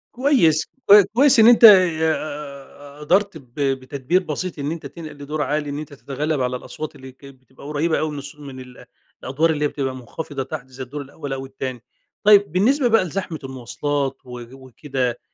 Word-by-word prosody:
كويس، 240 - +3 0.2
كو 205 0 +9
كويس 265 +1 +5
إن 225 - +7
أنتَ 240 0 +6
ي 175 -7 +7 0.9
قدرت 185 +4 +1
ب 125 -5 -19 0.3
بتدبير 140 +7 -1
بسيط 160 +1 -5
إن 145 +2 -3
أنتَ 165 - -7
تنقل 160 -3 -9
لدور 150 +2 -5
عالي، 150 +1 -2
إن 145 - -4
أنتَ 150 -1 -9
تتغلب 145 +1 -3
على 125 0 -1
الأصوات 155 +4 -8
اللي 130 -1 -12
كانت 135 0 -16
بتبقى 130 +1 -17
قريبة 155 +2 0
أوي 155 -1 -2
من 145 - -7
الصو 145 +1 -10
من 135 -2 -9
ال 125 -1 -13 0.4
الأدوار 150 +6 +1
اللي 150 -2 0
هي - - +3
بتبقى 135 -3 -4
مخفضة 135 +3 -6
تحت، 130 -1 -7
زي 130 0 -8
الدور 145 +4 -7
الأول 140 0 -7
أو 135 0 -5
التاني. 130 -2 -7 0.4
طيب، 205 -2 +5
بالنسبة 245 - +2
بقى 225 -3 +3
لزحمة 175 -2 -5
المواصلات 135 +2 -3
و 125 -1 -9
وكده، 130 -1 -4
145 Hz, 185 wpm, -21 LUFS, 130-165 Hz, 0.9 s, كو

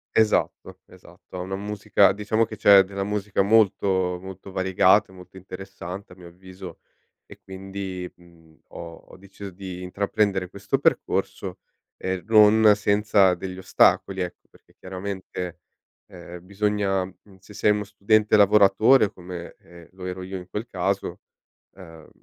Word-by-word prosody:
Esatto, 110 -1 0
esatto. - - -17
Ha - - -5
una 95 +2 -4
musica 100 -1 +2
diciamo 110 +2 0
che 110 - -9
c'è 100 -1 +7
della 100 0 -5
musica 105 -1 -1
molto, 95 -4 +2
molto 95 +1 -10
variegata 95 +2 +3
e - - -16
molto 90 +1 -14
interessante, 95 0 -9
a - - -17
mio 90 -2 -14
avviso, 95 0 -12 0.5
e - - -14
quindi, 95 -1 -7
mhmm, 85 -2 -22
ho 85 -1 -9 0.2
ho - - -14
deciso 100 +1 -11
di 90 0 -8
intraprendere 100 0 -1
questo 100 +1 -3
percorso, - - -1 0.4
ehm, 95 -2 -4
non 110 0 +6
senza 100 -2 +3
degli 95 +1 -7
ostacoli, 95 0 +2
ecco, 90 -1 -7
perché, - - -25
chiaramente, 95 -2 -6 0.5
ehm, 90 -1 -11
bisogna 100 -1 -1
mhmm, 95 +1 -17
se 100 +2 -16
sei 105 - +1
uno 105 0 +1
studente 105 +1 +1
lavoratore 105 +3 +5
come, 90 -1 -9
ehm, 85 -1 -16
lo 95 0 -10
ero 90 0 -5
io 95 +1 -6
in 90 0 -11
quel 105 +3 -5
caso, 95 -1 -3 0.6
ehm, 80 -4 -14
95 Hz, 145 wpm, -24 LUFS, 90-100 Hz, 0.6 s, c'è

